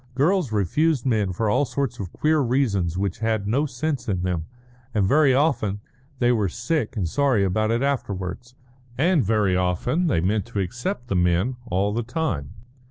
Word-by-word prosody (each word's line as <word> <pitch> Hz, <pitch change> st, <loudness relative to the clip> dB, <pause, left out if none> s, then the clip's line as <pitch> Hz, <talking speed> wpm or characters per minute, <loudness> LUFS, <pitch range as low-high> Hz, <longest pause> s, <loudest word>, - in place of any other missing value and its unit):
Girls 155 Hz, -, +2 dB
refused 130 Hz, -, +1 dB
men 110 Hz, -7 st, +1 dB
for 110 Hz, +5 st, -1 dB
all 105 Hz, +7 st, +3 dB
sorts 140 Hz, -2 st, -2 dB
of 95 Hz, -3 st, -5 dB
queer 155 Hz, 0 st, +1 dB
reasons 115 Hz, -, +1 dB
which 100 Hz, -1 st, -2 dB
had 110 Hz, -2 st, 0 dB
no 140 Hz, +8 st, +1 dB
sense 135 Hz, 0 st, -3 dB
in 90 Hz, -3 st, -1 dB
them, 90 Hz, -3 st, -2 dB, 0.5 s
and 100 Hz, -3 st, +3 dB
very 145 Hz, +4 st, +4 dB
often 130 Hz, -8 st, +1 dB, 0.4 s
they 120 Hz, -1 st, +3 dB
were 105 Hz, -5 st, +1 dB
sick 120 Hz, -, -2 dB
and 95 Hz, -5 st, 0 dB
sorry 130 Hz, -, +2 dB
about 110 Hz, +3 st, 0 dB
it 115 Hz, +3 st, +1 dB
afterwards; 120 Hz, -2 st, -3 dB, 0.4 s
and 165 Hz, +2 st, +3 dB
very 105 Hz, -3 st, +2 dB
often 90 Hz, -, 0 dB
they 135 Hz, -, +2 dB
meant 100 Hz, +5 st, 0 dB
to 120 Hz, -4 st, -4 dB
accept 120 Hz, -, -3 dB
the 100 Hz, -, -1 dB
men 90 Hz, +7 st, +2 dB
all 100 Hz, +2 st, +1 dB
the 115 Hz, -, 0 dB
time. 120 Hz, -, -2 dB
115 Hz, 175 wpm, -24 LUFS, 95-140 Hz, 0.5 s, very